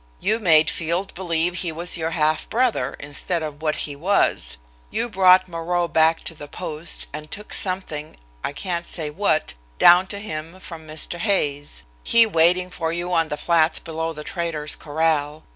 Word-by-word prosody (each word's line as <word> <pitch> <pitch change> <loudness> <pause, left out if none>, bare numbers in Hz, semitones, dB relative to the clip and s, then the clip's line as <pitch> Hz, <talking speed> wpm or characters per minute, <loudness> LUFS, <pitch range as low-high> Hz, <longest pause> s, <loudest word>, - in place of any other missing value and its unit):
You 220 +1 +1
made 160 -6 +5
Field 170 +4 -2
believe 175 -1 0
he 175 -2 -1
was 170 +3 -1
your 165 -2 -1
half 155 -1 0
brother, 230 - 0
instead 160 +4 -2
of 150 -1 -6
what 155 -1 0
he 145 - -6
was. 150 - +1 0.3
You 240 - -1
brought 185 -3 +5
Moreau 175 0 -1
back 160 0 +3
to - - -5
the 150 -2 -10
post 160 0 -3
and 150 +1 -7
took 210 +1 -5
something, 180 -5 -2 0.3
I - - -2
can't 170 +2 -4
say 155 -3 -1
what, 155 -2 0 0.2
down 180 - +7
to 200 - -5
him 165 -3 -7
from 165 -4 -10
Mr. 155 +3 -3
Hay's, 145 -8 0 0.2
he 230 0 +5
waiting 180 -1 +3
for 165 -2 -2
you 175 +1 -3
on 165 -2 +2
the 150 - -3
flats 165 0 +3
below 160 0 -4
the 150 -1 -8
trader's 160 -3 -3
corral. 155 -1 -1
165 Hz, 175 wpm, -22 LUFS, 155-180 Hz, 0.3 s, down